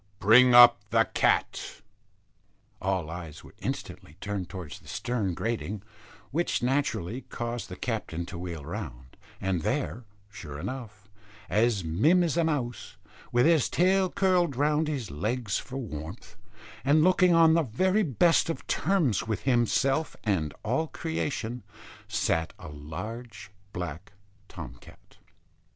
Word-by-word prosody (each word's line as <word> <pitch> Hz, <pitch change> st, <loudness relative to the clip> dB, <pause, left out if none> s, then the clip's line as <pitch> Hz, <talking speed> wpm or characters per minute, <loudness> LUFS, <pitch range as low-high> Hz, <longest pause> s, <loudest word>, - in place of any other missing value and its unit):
Bring 120 Hz, +5 st, +6 dB
up 120 Hz, 0 st, +9 dB
the -, -, +4 dB
cat." -, -, 0 dB, 1.0 s
All 95 Hz, -4 st, -1 dB
eyes 85 Hz, -3 st, -8 dB
were -, -, -14 dB
instantly 75 Hz, -, -6 dB
turned 100 Hz, -3 st, -4 dB
towards 85 Hz, -8 st, -7 dB
the -, -, -19 dB
stern 110 Hz, -7 st, -2 dB
grating, 105 Hz, -3 st, -3 dB, 0.5 s
which 165 Hz, -3 st, 0 dB
naturally 130 Hz, -4 st, 0 dB
caused 120 Hz, -1 st, -4 dB
the 90 Hz, -, -6 dB
captain 95 Hz, -7 st, -3 dB
to 85 Hz, -, -8 dB
wheel 85 Hz, -5 st, -6 dB
round; 65 Hz, -1 st, -7 dB, 0.2 s
and 95 Hz, -3 st, -1 dB
there, 125 Hz, -, -2 dB, 0.3 s
sure 75 Hz, -7 st, -8 dB
enough, 110 Hz, -, -7 dB, 0.4 s
as 110 Hz, -2 st, +2 dB
mim 140 Hz, -, +3 dB
as 165 Hz, -4 st, 0 dB
a 170 Hz, -, +3 dB
mouse, 135 Hz, -7 st, -3 dB, 0.3 s
with 120 Hz, +1 st, +4 dB
his 160 Hz, -5 st, +4 dB
tail 185 Hz, +1 st, +3 dB
curled 180 Hz, -7 st, +2 dB
round 150 Hz, +3 st, +2 dB
his 140 Hz, -7 st, -3 dB
legs 105 Hz, -, -1 dB
for 130 Hz, -, -7 dB
warmth, 80 Hz, -, -7 dB, 0.5 s
and 145 Hz, +3 st, +4 dB
looking 180 Hz, -1 st, +5 dB
on 165 Hz, -1 st, +6 dB
the 165 Hz, -, +4 dB
very 185 Hz, -, +1 dB
best 165 Hz, -, +3 dB
of 165 Hz, -, -4 dB
terms 155 Hz, -, +1 dB
with 110 Hz, -2 st, -2 dB
himself 135 Hz, +4 st, +1 dB
and 85 Hz, -9 st, 0 dB
all 130 Hz, +9 st, 0 dB
creation, 140 Hz, -8 st, -3 dB, 0.5 s
sat 80 Hz, -1 st, 0 dB
a -, -, -10 dB
large 100 Hz, +10 st, -8 dB, 0.2 s
black 90 Hz, +1 st, -6 dB, 0.3 s
Tom -, -, -9 dB
cat. -, -, -18 dB
120 Hz, 135 wpm, -28 LUFS, 95-150 Hz, 1.0 s, up